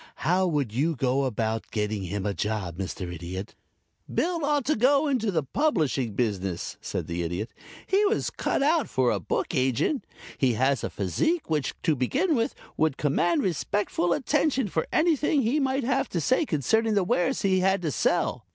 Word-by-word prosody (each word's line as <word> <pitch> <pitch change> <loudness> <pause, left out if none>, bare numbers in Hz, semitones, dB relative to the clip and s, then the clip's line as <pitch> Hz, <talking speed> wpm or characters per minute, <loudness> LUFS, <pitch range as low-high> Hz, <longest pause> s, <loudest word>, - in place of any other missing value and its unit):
How 185 +3 +3
would 145 -10 -1
you 155 +7 +1
go 130 +1 +1
about 110 -2 -2
getting 105 -1 -2
him 100 +2 -3
a 100 - 0
job, 100 -3 -2
Mr. 90 -1 -5
Idiot?" 90 +4 -6 0.6
"Bill 340 -2 0
ought 290 -2 +1
to 305 - +2
go 275 +6 +3
into 250 -6 +1
the 165 -6 0
publishing 145 - 0
business," 95 -7 -2
said - - -3
the 85 +1 -3
Idiot. 90 +6 -3 0.3
"He 390 +2 +2
was 420 +2 0
cut - - -1
out 310 +1 +2
for 130 -2 +2
a 100 - 0
book 90 - -2
agent. 130 - +1 0.4
He 130 -3 +3
has 130 +4 +1
a - - -1
physique 160 - -1
which, 150 -3 0
to 155 - +2
begin 280 - +1
with, 230 -5 0 0.2
would 155 -3 +1
command 150 +3 +1
respectful 180 +1 0
attention 265 - +1
for 160 - -1
anything 305 -3 +2
he 250 +7 +1
might 270 -1 0
have 265 +2 0
to 175 - -1
say 255 - +2
concerning 220 - +1
the 200 - +3
wares 175 -1 0
he 190 -1 +3
had 190 0 +2
to 155 - 0
sell. 110 - 0
160 Hz, 180 wpm, -26 LUFS, -, 0.6 s, How